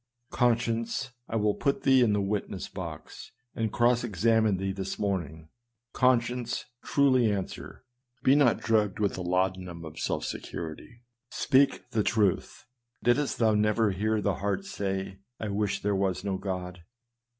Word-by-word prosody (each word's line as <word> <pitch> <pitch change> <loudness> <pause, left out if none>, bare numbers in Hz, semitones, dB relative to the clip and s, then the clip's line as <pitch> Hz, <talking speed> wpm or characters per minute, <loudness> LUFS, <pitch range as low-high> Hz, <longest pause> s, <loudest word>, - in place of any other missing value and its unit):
Conscience, 115 +1 0 0.2
I - - -3
will 105 -1 +2
put 140 +5 -1
thee 130 -1 +5
in 115 -3 +4
the 105 -1 +1
witness 100 +1 -3
box, - - -8 0.2
and 110 -2 -2
cross 120 0 +3
examine 110 -1 +2
thee 95 +1 -2
this 95 0 -4
morning! 80 -6 -3 0.4
Conscience, 125 -1 +1 0.2
truly 130 -5 +3
answer! 100 +4 -5 0.4
be 130 - +5
not 140 -5 +4
drugged 105 -3 +1
with 100 -2 +1
the 90 - -5
laudanum 90 -1 -1
of 80 0 -9
self - - -1
security! 85 +9 -7 0.3
speak 135 -2 +2
the 115 - +1
truth! 105 -1 0 0.4
Didst 135 +4 +2
thou 110 -2 +3
never 105 0 +2
hear 105 +3 0
the 100 -2 0
heart 100 - -2
say, 95 - -4
" 125 - -55
I 110 - -3
wish 100 +1 -1
there 100 0 +1
were 95 -1 +1
no 95 -2 -2
God 90 -2 -5
105 Hz, 150 wpm, -28 LUFS, 95-120 Hz, 0.4 s, thee